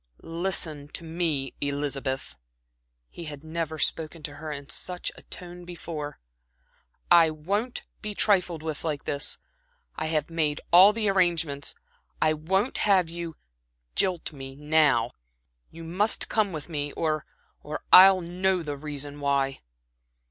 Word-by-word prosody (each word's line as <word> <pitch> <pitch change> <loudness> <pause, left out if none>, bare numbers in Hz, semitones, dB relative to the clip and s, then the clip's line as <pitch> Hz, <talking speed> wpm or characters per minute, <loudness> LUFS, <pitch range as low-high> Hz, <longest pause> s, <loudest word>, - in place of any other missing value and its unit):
"Listen 165 -4 -2
to - - -3
me, 160 -5 -1
Elizabeth." 140 - -2 0.8
He 170 - -8
had 150 -1 -8
never 160 0 -4
spoken 160 +1 0
to 145 -2 -6
her 155 0 -6
in 140 -1 -7
such 180 +3 -2
a - - -12
tone 180 -1 -10
before. 165 -4 -6 0.9
"I 170 -2 +7
won't 200 +11 -2 0.2
be 210 -1 -4
trifled 180 -7 +2
with 155 -2 -4
like 150 -3 -2
this. 140 0 0 0.6
I 155 - -3
have 155 0 -1
made 155 -3 0
all 185 +4 +9
the 215 0 -1
arrangements. 170 -7 +2 0.4
I 155 0 +3
won't 190 - 0
have 185 -5 +3
you 170 -1 -6 0.6
jilt 180 -4 +1
me 135 -1 -9
now. 150 -5 +3 0.6
You 165 +1 -11
must 185 +7 +1
come 215 -3 +1
with 155 -3 -6
me, 145 -3 -3
or 155 -2 -1 0.4
I 150 +1 -4 0.2
I'll 190 0 +10
know 180 +1 0
the 145 -2 -4
reason 145 0 -3
why." 140 -1 0
160 Hz, 140 wpm, -26 LUFS, 145-175 Hz, 0.9 s, I'll